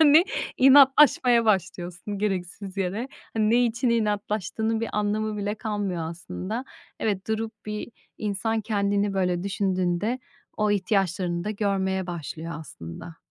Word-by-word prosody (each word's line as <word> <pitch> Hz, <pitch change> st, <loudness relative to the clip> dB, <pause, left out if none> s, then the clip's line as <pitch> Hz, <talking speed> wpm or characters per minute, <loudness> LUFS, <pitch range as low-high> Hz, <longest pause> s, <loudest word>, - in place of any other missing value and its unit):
yani 310 Hz, +2 st, +7 dB, 0.3 s
inatlaşmaya 265 Hz, -3 st, +6 dB
başlıyorsun 190 Hz, -1 st, -1 dB
gereksiz 195 Hz, -1 st, -3 dB
yere. 195 Hz, +7 st, -2 dB, 0.3 s
Hani, 215 Hz, -1 st, +2 dB
ne 245 Hz, +2 st, +5 dB
için 235 Hz, +1 st, 0 dB
inatlaştığının 215 Hz, 0 st, 0 dB
bir 230 Hz, -, -2 dB
anlamı 210 Hz, +1 st, 0 dB
bile 205 Hz, +1 st, -2 dB
kalmıyor 200 Hz, -7 st, -3 dB
aslında. 185 Hz, +7 st, -5 dB, 0.4 s
Evet, 205 Hz, -2 st, -1 dB
durup 220 Hz, 0 st, -1 dB
bir 210 Hz, 0 st, -4 dB, 0.3 s
insan 215 Hz, +2 st, -1 dB
kendini 200 Hz, -1 st, 0 dB
böyle 180 Hz, -2 st, +1 dB
düşündüğünde 195 Hz, +3 st, 0 dB, 0.4 s
o 210 Hz, -1 st, +2 dB
ihtiyaçlarını 185 Hz, -3 st, 0 dB
da 210 Hz, -, -1 dB
görmeye 190 Hz, -3 st, 0 dB
başlıyor 165 Hz, -1 st, -5 dB
aslında. 110 Hz, -, -9 dB
205 Hz, 120 wpm, -26 LUFS, 185-220 Hz, 0.4 s, yani